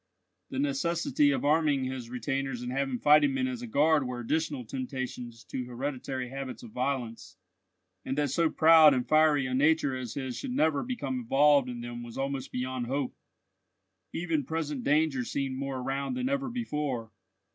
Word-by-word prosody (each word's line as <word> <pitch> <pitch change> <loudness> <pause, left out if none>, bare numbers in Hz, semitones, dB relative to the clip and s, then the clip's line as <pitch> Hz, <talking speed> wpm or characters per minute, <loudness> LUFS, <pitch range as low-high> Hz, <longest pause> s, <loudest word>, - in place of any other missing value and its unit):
The - - -5
necessity 145 +1 +1
of 140 - 0
arming 150 -2 +3
his 130 -2 -5
retainers 125 0 -3
and 125 - -4
having 135 -1 -1
fighting 150 - +5
men 260 -1 0
as 250 -2 -4
a 245 - -6
guard 155 - +3
were 125 -1 -4
additional 145 +1 -2
temptations 125 -2 -5
to 125 - -5
hereditary 130 0 -4
habits 135 -1 -6
of 115 - -10
violence; 120 -7 -3 0.7
and 135 +1 -3
that 145 -3 +1
so 165 +3 +2
proud 160 -3 +7
and 125 - -1
fiery 155 -3 +4
a 130 - -3
nature 145 0 +3
as 125 -3 -5
his 130 -3 -4
should 265 -3 -4
never 155 - +2
become 140 - -3
involved 135 +2 +4
in 120 -1 -6
them 120 0 -6
was 120 -1 -9
almost 135 -1 -3
beyond 125 -1 -3
hope. 135 0 -2 1.0
Even 165 -3 -1
present 150 -2 -3
danger 145 -3 +2
seemed 135 +1 -3
more 135 0 -3
around 135 - -2
than 255 +1 -1
ever 275 -1 -1
before. 150 - -3
135 Hz, 170 wpm, -29 LUFS, 125-155 Hz, 1.0 s, proud